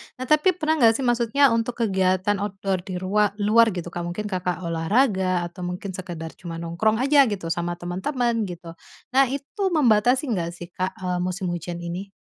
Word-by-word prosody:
nah 255 - -6
tapi 330 +4 +4
pernah 315 -2 0
enggak 230 -3 +6
sih 265 - -2
maksudnya 240 +2 +3
untuk 230 +1 0
kegiatan 190 0 +1
outdoor 195 -2 -2
di 185 - -4
rua 200 +3 +1
luar 220 +2 +4
gitu 175 -1 -5
Kak, 175 - -5
mungkin 210 +4 -4
Kakak, 180 -1 -2
olahraga 185 +2 +1
atau 175 +1 -8
mungkin 180 +2 -5
sekedar 175 -3 -7
cuma 170 -2 -7
nongkrong 170 +6 0
aja 280 -1 +5
gitu 185 -6 -3
sama 175 0 -2
temen-temen 225 +6 -1
gitu, 175 -2 -8 0.4
nah 270 +1 +4
itu 280 +9 -6
membatasi 245 -1 +4
engggak 170 -4 -2
sih 175 0 -10
Kak, 185 +2 -3
eee, 180 -1 -1
musim 180 0 -2
hujan 175 0 -5
ini? 180 +3 -5
190 Hz, 180 wpm, -24 LUFS, 175-230 Hz, 0.4 s, enggak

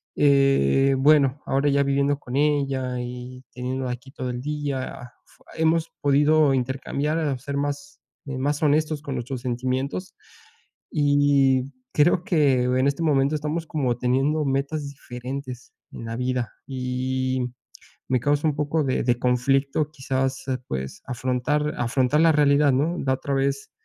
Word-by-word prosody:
eh, 135 - +4
bueno, 145 -1 +4
ahora 140 +2 +1
ya 140 0 +3
viviendo 140 +1 +1
con 125 -2 -7
ella 135 -4 0
y 125 +1 -8
teniéndola 130 +1 -3
aquí 125 +2 -8
todo 130 -2 -5
el 125 0 -4
día, 140 -4 -4 0.4
hemos 160 0 +2
podido 145 +1 +4
intercambiar, 140 +3 -1
ser 140 +2 -4
más, 145 0 -4 0.3
más 140 +2 -2
honestos 155 0 +1
con 140 -2 -5
nuestros 125 0 -4
sentimientos. 130 +7 -3 0.8
Y 140 -2 +3 0.2
creo 170 +3 +3
que 145 -8 +2
en 130 +2 +2
este 140 +4 -1
momento 145 -1 +2
estamos 155 +2 -2
como 130 -6 -1
teniendo 135 +5 +1
metas 140 +2 -1
diferentes 130 -1 -8 0.2
en 115 - -8
la 115 - -4
vida. 125 -2 -1 0.2
Y 130 0 -2 0.6
me 130 - +2
causa 145 +4 +1
un 150 - 0
poco 150 +1 0
de 130 -2 0
de 120 -1 +2
conflicto, 135 +4 +1
quizás, 135 -2 -2 0.2
pues, 65 +10 -5
afrontar 130 +4 -1
afrontar 130 +4 +1
la 165 0 +6
realidad, 145 -1 +4
¿no? 155 +7 +1
La 130 -1 0
otra 140 +1 -3
vez 140 +1 -1
135 Hz, 140 wpm, -24 LUFS, 130-145 Hz, 0.8 s, la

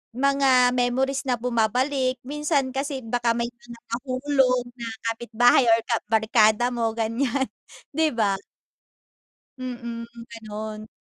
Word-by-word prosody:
mga 265 -2 +4
memories 260 +2 0
na 250 -3 0
bumabalik, 250 +3 0
minsan 295 -2 0
kasi 275 0 -2
baka 235 +1 +1
may 235 - 0
mga 240 0 -13 0.2
nahulog 255 -1 +1
na 235 -2 -6 0.2
kapitbahay 240 +3 +3
or 225 - +5
kabarkada 220 0 +3
mo 230 -1 0
ganyan, 235 +4 -1 0.5
di 320 -1 +3
ba? 210 -4 +1 1.2
Mm, 235 -2 -5 0.2
ganun. 215 -1 -7
245 Hz, 110 wpm, -24 LUFS, 230-265 Hz, 1.2 s, or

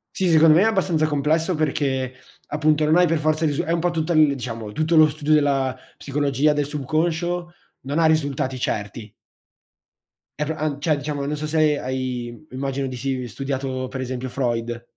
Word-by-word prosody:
Sì, 190 - +1
secondo 160 -1 +6
me 170 - +5
è - - +3
abbastanza 180 -7 +1
complesso 155 +4 +1
perché 135 -4 -1 0.3
appunto 155 +1 +1
non 155 +2 +4
hai 180 0 +5
per 165 0 +1
forza 155 +1 +1
il 150 - +2
risu 155 +4 -1
è 165 - -3
un 170 - +1
po' 175 +1 +1
tutto 165 0 -2
l 155 -3 +4
diciamo, 115 -5 -6
tutto 160 +4 +1
lo 155 0 +8
studio 150 0 -3
della 140 -3 +2 0.2
psicologia, 145 +1 0
del 145 -1 0
subconscio, 165 +4 -2 0.3
non 140 +4 -3
ha 165 - +4
risultati 140 -4 0
certi. 105 0 -4 1.3
È 150 - 0
pro 160 - -3
an 150 -2 -2
cioè, 155 -2 +2
diciamo 145 0 -4
non 150 +2 -2
so 155 - -4
se 155 -1 +2
ha - - -7
hai, 130 +1 -4
immagino 135 +1 -3
di 130 - -6
sì, 130 0 -3
studiato 130 0 -3
per 130 0 -5
esempio 130 0 -4
Freud. 120 -2 -2
145 Hz, 190 wpm, -22 LUFS, 130-155 Hz, 1.3 s, lo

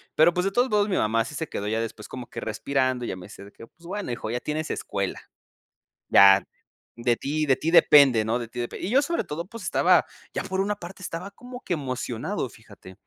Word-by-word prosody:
pero, 165 +3 +5
pues, 180 +1 0
de 195 - +1
todos 245 +5 +2
modos, 210 -1 +2
mi 185 - 0
mamá 115 +1 +2
sí 145 - -8
se 160 - -3
quedó 100 - -4
ya 110 +1 0
después 110 -1 -6
como 125 -2 -8
que - - -7
respirando 130 +2 -1
y - - -4
ya - - -3
me 90 -1 -10
dice 100 -1 -12
que 115 - -13
"pues 170 +6 -23
bueno, 200 -8 -4
hijo, 120 - -4
ya 120 - -1
tienes 155 +3 -3
escuela". 100 -1 -3 0.9
Ya, 100 -1 +7 0.5
de 120 0 +1
ti 155 +2 -1
de 135 -3 +4
ti 165 - -2
depende, 140 -9 +7
¿no? 115 +3 0
De 120 - -5
ti 115 - -8
depende 120 +7 -4
"Y - - -3
yo 270 +3 +5
sobre 335 +4 -1
todo, 165 +3 -5
pues 230 -1 -10
estaba - - +3 0.3
ya, - - -2
por 190 0 -1
una 205 +1 -1
parte, 185 0 -10
estaba 180 +2 -6
como 245 +4 -11
que 175 - -3
emocionado, 130 - -3
fíjate, 100 -5 -15
140 Hz, 235 wpm, -25 LUFS, 115-185 Hz, 0.9 s, Ya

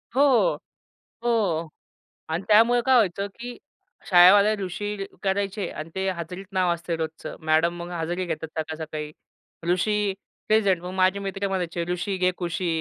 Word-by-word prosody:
हो. 280 - +4 0.7
हो. 195 -9 +1 0.6
आणि 165 +4 -2
त्यामुळे 230 +3 +5
काय 265 -1 +5
व्हायचं 200 -4 +2
की 245 0 -7 0.5
शाळेवाले 200 +4 +7
ऋषी 200 +2 -4 0.2
करायचे 195 0 -1
आणि 155 +1 -7
ते 190 0 -1
हजेरीत 180 +1 -6
नाव 185 -2 +2
असतंय 170 0 -4
रोजचं. 160 -1 -5
मॅडम 160 +2 +3
मग 170 - -6
हजेरी 175 +2 -2
घेतात 160 -2 -4
सकाळ-सकाळी, 155 -1 -5 0.6
"ऋषी, 210 +4 +1 0.5
प्रेझेंट." 200 -5 +3
मग 180 +1 -6
माझे 190 +1 +2
मित्र 195 0 -3
म्हणायचे, 180 -3 -2
"ऋषी 185 +2 -2
घे 185 0 +2
कुशी, 175 0 -2
185 Hz, 140 wpm, -25 LUFS, 170-200 Hz, 0.7 s, शाळेवाले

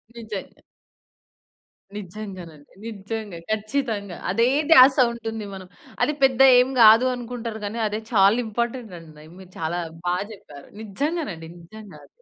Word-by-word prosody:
నిజంగా. 220 -4 -8 1.4
నిజంగానండి. 185 -6 -10
నిజంగా. 210 -3 -6
ఖచ్చితంగా! 215 -3 -3
అదే 230 +5 +2 0.2
ధ్యాస 265 -2 +8 0.2
ఉంటుంది 225 -2 -6
మనం. 190 -1 -9 0.4
అది 300 - +1
పెద్ద 265 -1 +3 0.2
ఏమి 250 +2 +3
కాదు 225 +3 +7
అనుకుంటారు 235 -2 -6
కానీ, 215 +3 -5
అదే 210 +1 -4
చాలా 200 0 +5
ఇంపార్టెంట్ 235 -1 -4
అండి 155 -2 -15
మీరు 185 -1 -14
చాలా 165 +2 -2 0.3
బా 175 0 +1 0.2
చెప్పారు. 145 -8 -14
నిజంగానండి! 220 - -4
నిజంగా 210 +4 -13
అది. - - -17
215 Hz, 125 wpm, -23 LUFS, 185-235 Hz, 1.4 s, ధ్యాస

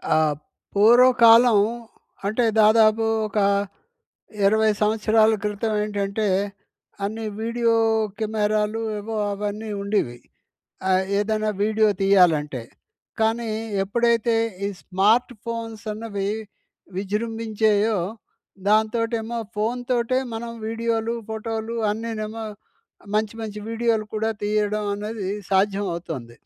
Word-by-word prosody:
ఆహ్, 155 -1 +2 0.4
పూర్వకాలం 235 +1 +7 0.7
అంటే 225 +4 +1 0.2
దాదాపు 220 +1 +5 0.2
ఒక 210 0 -2 1.1
20 220 +2 +4
సంవత్సరాల 220 +1 +3
క్రితం 210 +1 -1
ఏంటంటే, 205 0 -2 0.8
అన్ని 220 +3 -3 0.2
వీడియో 230 0 +1 0.5
కెమెరాలు 215 0 0 0.2
ఏవో 220 +2 -5 0.2
అవన్నీ 210 +2 -4
ఉండేవి. 200 - -1 0.7
ఆహ్, 185 0 +3 0.2
ఏదైనా 215 +1 0
వీడియో 215 0 +3
తీయాలంటే. 160 -9 +3 0.6
కానీ 225 +1 +1 0.3
ఎప్పుడైతే 235 +2 +1 0.3
ఈ - - +1
స్మార్ట్‌‌ఫోన్స్ 225 +2 0
అన్నవి 205 -2 -4 0.7
విజృంభించాయో 215 +1 0 0.7
దాంతోటేమో 225 +2 +1 0.2
ఫోన్ 225 +4 -1
తోటే 245 0 +1 0.2
మనం 230 +1 -5 0.2
వీడియోలు, 230 0 -1 0.2
ఫోటోలు 220 +1 -4 0.2
అన్నినేమో 220 0 -4 0.7
మంచి 215 0 0
మంచి 210 -1 -5
వీడియోలు 230 -1 0
కూడా 220 +1 0
తీయడం 210 0 0
అనేది 210 -1 -4 0.2
సాధ్యం 200 +1 +2
అవుతుంది. 150 -9 -6
215 Hz, 90 wpm, -23 LUFS, 205-225 Hz, 1.1 s, పూర్వకాలం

